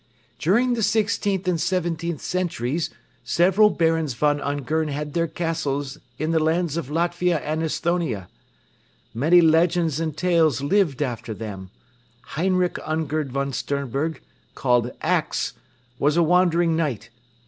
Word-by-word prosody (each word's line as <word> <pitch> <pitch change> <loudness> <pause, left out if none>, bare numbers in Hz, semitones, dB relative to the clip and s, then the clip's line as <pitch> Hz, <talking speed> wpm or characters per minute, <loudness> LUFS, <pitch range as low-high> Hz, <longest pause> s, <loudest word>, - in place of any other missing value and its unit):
"During 240 +9 +2
the 235 - -1
sixteenth 200 -3 0
and 170 -3 +1
seventeenth 170 -2 -1
centuries 165 -4 -2 0.3
several 185 - +4
Barons 160 - 0
von 145 +3 +1
Ungern 145 +3 -1
had 150 0 -4
their 170 0 +1
castles 150 -4 -3 0.2
in 155 +3 -1
the 165 - +3
lands 160 0 +1
of 170 -6 -3
Latvia 175 +2 +1
and 155 +1 -2
Esthonia. 160 - -1 0.9
Many 160 +10 +5
legends 165 -1 +3
and 155 -2 -3
tales 165 -7 +2
lived 155 -4 +2
after 120 -4 -4
them. 100 -3 -7 0.6
Heinrich 180 +2 +1
Ungern 155 -2 -2
von 140 +1 -2
Sternberg, 140 +5 -2 0.3
called 125 -2 +1
'Ax,' - - 0 0.5
was 150 +3 +2
a 170 - +5
wandering 170 -1 +3
knight. 145 -9 -2
160 Hz, 125 wpm, -23 LUFS, 140-175 Hz, 0.9 s, Many